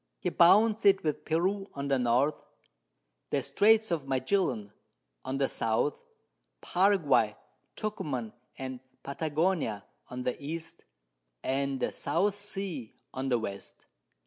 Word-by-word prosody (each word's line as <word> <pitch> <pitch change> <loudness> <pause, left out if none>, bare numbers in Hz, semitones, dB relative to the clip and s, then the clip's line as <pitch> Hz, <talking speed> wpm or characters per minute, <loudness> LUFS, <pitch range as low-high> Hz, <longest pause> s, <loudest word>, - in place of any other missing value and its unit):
He - - -1
bounds 210 +6 +5
it 195 -1 +5
with 150 -2 -2
Peru 190 +5 0
on 140 0 -3
the 135 -1 +2
North, 125 +5 +1 0.8
the - - 0
Straits 220 0 +4
of 155 -5 -1
Magellan 130 - 0 0.5
on 130 - -3
the 135 -1 +2
South, 115 +6 0 0.7
Paraguay, 150 - +3 0.4
Tucuman, 130 - -3 0.2
and 130 -1 -5 0.2
Patagonia 150 - -1 0.2
on 125 0 -6
the 125 +3 -3
East, 165 +3 -6 0.6
and 135 0 -1
the - - 0
South 175 +8 0
Sea 195 - -6 0.2
on 135 +1 -3
the 125 - +3
West. 100 -3 -7
145 Hz, 120 wpm, -30 LUFS, 130-190 Hz, 0.8 s, bounds